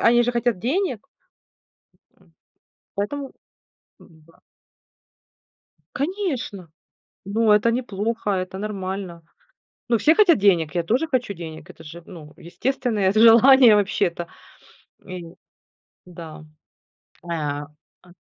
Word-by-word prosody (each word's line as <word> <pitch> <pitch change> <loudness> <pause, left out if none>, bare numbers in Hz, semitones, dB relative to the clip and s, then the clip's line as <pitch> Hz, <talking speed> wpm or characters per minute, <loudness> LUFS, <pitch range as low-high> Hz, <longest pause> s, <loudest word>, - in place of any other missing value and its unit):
они 240 - +4
же 245 - 0
хотят 235 -3 0
денег. 270 - -2 1.1
М. - - -27 0.6
Поэтому, 270 +7 -4 0.7
м-да. 160 0 -21 1.6
Конечно, 275 - -4 0.6
но 215 +2 +2
это 210 +3 +3
не 245 +2 0
плохо, 220 0 -4
это 185 0 -3
нормально. 190 -4 -5 0.7
Ну, 235 - +3
все 310 +10 +3
хотят 390 -6 +5
денег, 180 -5 +2
я 170 - 0
тоже 255 - 0
хочу 245 -7 -1
денег. 160 -3 -10
Это 160 - -14
же, 170 +3 -11
ну, 155 -5 -12
естественное 220 +1 -1
з 215 - +1
желание 235 +1 +7
вообще-то, 190 -4 -1 0.8
и 185 -3 -8 0.8
да. 165 -3 -11 0.8
Э, - - -15
а, 145 -3 -3 0.4
а 180 -1 -19
205 Hz, 110 wpm, -22 LUFS, 175-240 Hz, 1.6 s, желание